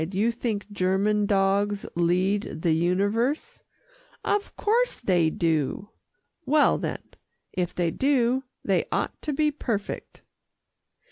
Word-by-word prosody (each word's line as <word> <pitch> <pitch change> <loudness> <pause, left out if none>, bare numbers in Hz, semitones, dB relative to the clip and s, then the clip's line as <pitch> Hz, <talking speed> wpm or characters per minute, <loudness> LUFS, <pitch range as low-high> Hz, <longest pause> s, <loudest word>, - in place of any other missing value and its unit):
"You 215 +5 +2
think 230 -3 -3
German 200 +2 +1
dogs 200 +1 +1
lead 180 +1 0
the 170 - +3
universe." 205 - 0 0.6
"Of 410 0 -1
course 475 +4 +1
they 175 -7 +2
do." 160 +4 -1 0.5
"Well 300 0 +3
then, - - -4 0.5
if 180 -1 -2
they 170 -2 +1
do, 260 - +2 0.2
they - - +2
ought - - -2
to 305 - -2
be 300 +1 +2
perfect." 225 -8 -4
205 Hz, 115 wpm, -26 LUFS, 180-250 Hz, 0.6 s, the